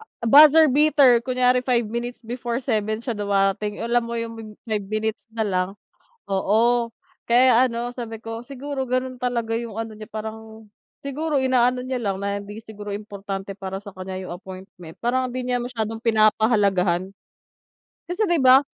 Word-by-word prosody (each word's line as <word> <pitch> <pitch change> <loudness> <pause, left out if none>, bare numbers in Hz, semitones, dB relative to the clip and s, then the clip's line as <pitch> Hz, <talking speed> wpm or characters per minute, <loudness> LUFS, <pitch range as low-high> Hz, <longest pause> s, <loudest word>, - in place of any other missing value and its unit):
A 445 - -9
buzzer 305 +4 +8
beater, 280 -4 +5
kunyari 250 -1 +2
5 245 -2 +2
minutes 240 +2 -4
before 240 0 -3
7 220 -4 -1
siya 245 - -1
dumarating 200 0 0
alam 240 +1 +2
mo 235 0 -4
yung 230 0 -4
mim 225 -1 -9 0.2
5 210 -2 -1
minutes 215 0 -2
na 225 -1 -1
lang, 185 -3 0 0.6
oo, 230 +5 +2 0.4
kaya 250 +1 +6
ano 240 0 -3
sabi 225 -3 -6
ko 225 0 -5
"siguro 275 0 -5
ganun 255 0 -1
talaga 235 -2 -1
yung 230 -2 -6
ano, 225 -1 -4
niya 215 - -8
parang 220 0 -8 0.4
siguro 290 +2 -1
inaano 250 -1 +2
niya 255 0 -3
lang, 195 -3 -1
na 200 0 -1
hindi 205 +1 -9
siguro 210 -2 -9
importante 200 -1 -6
para 190 0 -5
sa 200 - -9
kanya 185 0 -6
yung 185 - -8
appointment 185 -2 -11
parang 255 +2 +1
hindi 250 0 -4
niya 245 - +1
masyadong 225 -2 -4
pinapahalagahan". 205 -5 +2 1.0
Kasi 355 +5 -2
'di 345 -2 +2
ba 260 +1 +7
230 Hz, 165 wpm, -23 LUFS, 205-250 Hz, 1.0 s, buzzer